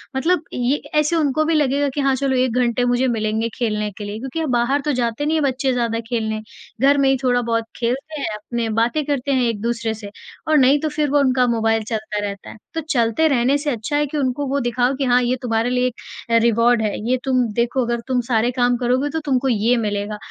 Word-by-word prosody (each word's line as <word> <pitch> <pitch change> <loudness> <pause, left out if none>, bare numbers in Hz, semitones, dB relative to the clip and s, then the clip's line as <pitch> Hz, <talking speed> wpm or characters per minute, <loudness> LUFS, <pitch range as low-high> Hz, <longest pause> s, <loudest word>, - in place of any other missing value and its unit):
मतलब 325 +4 +1
ये 250 +3 +1 0.2
ऐसे 300 +3 +1
उनको 310 -1 +1
भी 330 - +1
लगेगा 285 -1 +2
कि 290 - 0
हाँ, 275 -1 +2
चलो 265 0 0
1 255 -2 +1
घंटे 245 0 +1
मुझे 245 +1 +2
मिलेंगे 220 0 -1
खेलने 210 -3 -1
के 210 - -6
लिए, 205 +1 -5
क्योंकि 270 +5 -5
हम 315 -5 -1
बाहर 245 +4 +1
तो 300 - +1
जाते 235 +4 -1
नहीं 315 +1 +1
हैं 305 - 0
बच्चे 265 -1 0
ज़्यादा 230 -2 -1
खेलने। 220 -2 -2 0.4
घर 280 +1 +5
में 275 -1 +3
ही 270 - +3
थोड़ा-बहुत 235 -2 +1
खेलते 270 +6 -2
हैं - - -1
अपने 235 +3 -4
में 215 - -3
बातें 235 +7 +1
करते 280 -1 -1
हैं 260 -2 +2
एक-दूसरे 230 +1 -2
से। 210 -2 -9 0.4
और 310 -1 +4
नहीं 275 +2 +5
तो 310 - -1
फिर 295 -1 -1
वो 290 0 +3
उनका 255 -2 +3
मोबाइल 225 -1 +1
चलता 215 -2 -3
रहता 200 -1 -8
है। - - -11 0.2
तो 325 - -2
चलते 240 +4 +2
रहने 270 0 +2
से 295 0 -3
अच्छा 235 +5 -3
है 295 - +2
कि 300 - -4
उनको 275 +1 -1
वो 280 +1 0
दिखाओ 245 +2 +1
कि 275 - -2
हाँ, 250 0 +4
ये 250 +1 +1
तुम्हारे 230 0 0
लिए 250 0 +1
एक 250 - -5 0.5
रिवार्ड 235 0 +3
है। 210 -1 -1
ये 255 - +3
तुम 255 -2 +2
देखो 240 +2 0
अगर 235 0 -1
तुम 255 -1 +1
सारे 230 +2 +2
काम 245 0 +1
करोगे 255 +4 0
तो 320 - -2
तुमको 270 -2 +1
ये 230 +2 +2
मिलेगा। 210 -1 -2
250 Hz, 235 wpm, -20 LUFS, 230-275 Hz, 0.5 s, घर